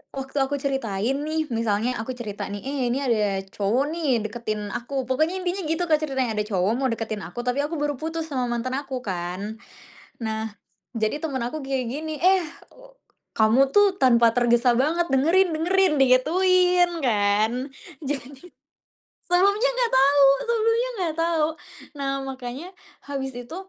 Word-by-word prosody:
waktu 270 +1 -6
aku 270 +1 +1
ceritain 265 -3 -1
nih, 315 0 -1
misalnya 225 +1 0
aku 225 +3 -4
cerita 205 -4 -6
nih, 205 0 -6
"Eh 275 +1 -3
ini 260 - 0
ada 210 -6 0
cowok 220 +7 0
nih 275 -10 0
deketin 215 -2 -4
aku." 265 +2 -3
Pokoknya 315 +7 +1
intinya 365 +2 -2
gitu, 325 +2 0
Kak, 305 -1 +4
ceritanya 265 -6 -1
ada 210 - 0
cowok 190 -1 +1
mau 270 - +1
deketin 220 -2 -4
aku. 240 - -6
Tapi 250 +3 -1
aku 315 +3 -3
baru 290 0 -1
putus 325 0 -4
sama 250 -2 -1
mantan 240 +2 -2
aku 265 -3 -6
kan. 190 +3 -4 0.6
Nah, 220 0 -3 0.4
jadi 220 +6 -1
temen 270 -6 -2
aku 245 +6 -3
kayak 265 -2 -2
gini, 310 +2 -4
"Eh, 375 0 +5 0.3
u - - -17 0.4
kamu 235 +5 +4
tuh 410 -2 +5
tanpa 235 -3 +5
tergesa 240 0 +3
banget 330 +6 +1
dengerin 335 +8 +3
dengerin," 365 +2 +2
digituin 355 +7 +4
kan. 210 -2 +2 0.5
Jadi, 275 -1 -5 0.9
sebelumnya 400 +7 +3
nggak - - +1
tahu 280 +1 +5 0.2
sebelumnya 460 +1 +1
nggak 335 -4 -1
tahu. 330 -2 +2 0.5
Nah 275 -1 -1
makanya 260 +5 -6 0.4
habis 270 -2 -4
itu, 245 +6 -8
270 Hz, 155 wpm, -24 LUFS, 230-320 Hz, 0.9 s, Eh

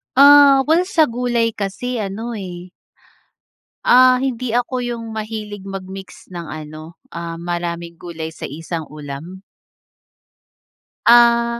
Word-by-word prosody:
Ah, 280 0 +8
well 345 +3 +4
sa 320 -7 +2
gulay 240 -1 0
kasi 220 +5 -3
ano 220 +3 -4
eh. 180 -2 -8 1.2
Ah, 255 0 +7
hindi 255 -2 -2
ako 250 +1 0
yung 235 -2 -5
mahilig 210 -2 -6
mag-mix 190 0 -9
ng 170 -2 -7
ano, 155 +1 -9 0.2
ah, 170 0 -6
maraming 170 0 -5
gulay 160 -2 -6
sa - - -7
isang 160 +2 -6
ulam. 150 +5 -9 1.7
Ah. 235 0 +5
205 Hz, 115 wpm, -19 LUFS, 170-240 Hz, 1.7 s, Ah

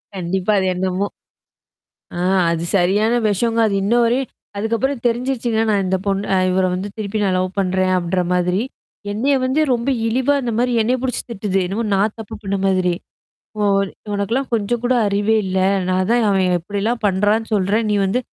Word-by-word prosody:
கண்டிப்பா. 185 +3 -1
அது 190 - 0
என்னமோ 190 +2 -1 1.0
ஆ - - -6 0.3
அது 165 0 -2
சரியான 200 +5 +2 0.2
வெஷங்க. 225 +3 0
அது 200 - -1
இன்னும் 235 +4 +3
வரையும் 250 +3 0 0.3
அதுக்கப்புறம் 230 +5 -1
தெரிஞ்சுருச்சுங்க. 240 -1 0
நான் 200 -2 +2
இந்த 190 +1 +1
பொண்ண 195 0 0
இவர 185 0 +2
வந்து 190 +3 -3
திருப்பி 215 0 -3
நான் 190 -2 +1
லவ் 185 0 0
பண்றேன் 185 0 +1
அப்பின்ற 180 +1 0
மாதிரி. 180 +3 +1 0.5
என்னைய 270 +7 +1
வந்து 275 +4 +1
ரொம்ப 240 +3 -1 0.2
இழிவா 260 +5 +1
அந்த 240 -2 -2
மாரி 245 +1 +1
என்னய 250 +4 +1
புடிச்சு 260 -1 -1
திட்டுது. 195 -3 -2
என்னமோ 205 +6 -2
நான் 205 +2 +1
தப்பு 215 - -7
பண்ண 200 0 -1
மாதிரி. 185 -2 +2 0.7
"ஓ - - -2 0.5
உனக்கெல்லாம் 230 +7 -1
கொஞ்சம் 230 +2 -1
கூட 255 +1 +2
அறிவே 205 +2 +1
இல்ல. 190 0 -1 0.3
நான் 185 0 +1
தான் 240 -1 +3
அவன் 190 -2 +2 0.2
இப்படிலாம் 205 +6 -2
பண்றான்னு 205 +3 +1
சொல்றேன். 205 +3 +1
நீ 205 - +2
வந்து. 245 +7 0
205 Hz, 165 wpm, -19 LUFS, 190-235 Hz, 1.0 s, இன்னும்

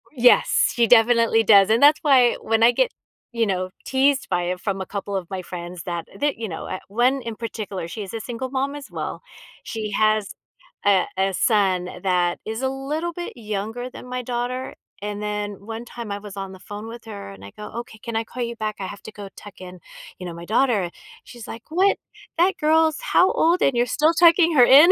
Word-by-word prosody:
Yes, 245 -3 +4
she 235 -2 +3
definitely 230 -1 +5
does, 200 -2 +6
and 225 +2 +3
that's 295 +2 +7
why 260 -5 +5
when 225 0 +1
I 235 - +7
get, - - +1 0.4
you 230 -2 +1
know, 185 -2 -1 0.2
teased 270 +1 +2
by 175 - 0
it 180 +1 -2
from 195 0 -3
a - - -4
couple 200 0 -5
of 185 -3 -4
my 190 -1 -4
friends, 175 -1 -7
that 170 -2 -4
that, 290 0 0
you 225 -2 -4
know, 160 - -6
eh, 185 - -5
1 250 +6 +2
in 230 -2 -6
particular, 210 -6 -5
she 205 +5 -6
is 195 - -9
a 225 - -3
single 245 +3 -5
mom 275 +1 -1
as 290 -1 -8
well. - - -5 0.4
She 215 -2 -5
has 215 0 +2 0.6
a 195 -2 +4
a 190 0 +1
son 190 -4 +2 0.2
that 180 -2 +1
is 220 +2 -4
a 265 - +1
little 295 +6 -3
bit 350 +1 -6
younger 220 +3 -4
than 250 - -11
my 250 0 -3
daughter, 250 +1 -3 0.3
and 205 0 -4
then 205 -1 -4
one 225 +2 -6
time 235 -3 -7
I 200 - -3
was 205 -1 -10
on 195 -1 -5
the 190 - -12
phone 205 +3 -8
with 235 +1 -10
her 205 - -8
and 100 0 -12
I 100 - -10
go, 210 - -8
"Okay, 220 -2 -15
can 230 -2 -5
I 225 - 0
call 250 +2 -5
you 235 0 -4
back? 215 -1 -3
I 190 - -3
have 200 - -9
to 220 - -9
go 205 -1 -9
tuck 205 -2 -12
in, 180 0 -10 0.4
you 180 - -7
know, 175 - -5
my 170 +1 -9
daughter." 215 -4 +1 0.3
She's, 240 -3 -11
like, 225 +1 -8
"What? 375 +5 +3 0.4
That 360 +3 +3
girl's 315 0 +3
how 365 - +3
old 340 +3 +2
and 275 - +3
you're 240 - +3
still 305 +6 +2
tucking 335 0 +5
her 250 -3 +8
in?" 295 +8 +8
225 Hz, 225 wpm, -23 LUFS, 195-260 Hz, 0.6 s, her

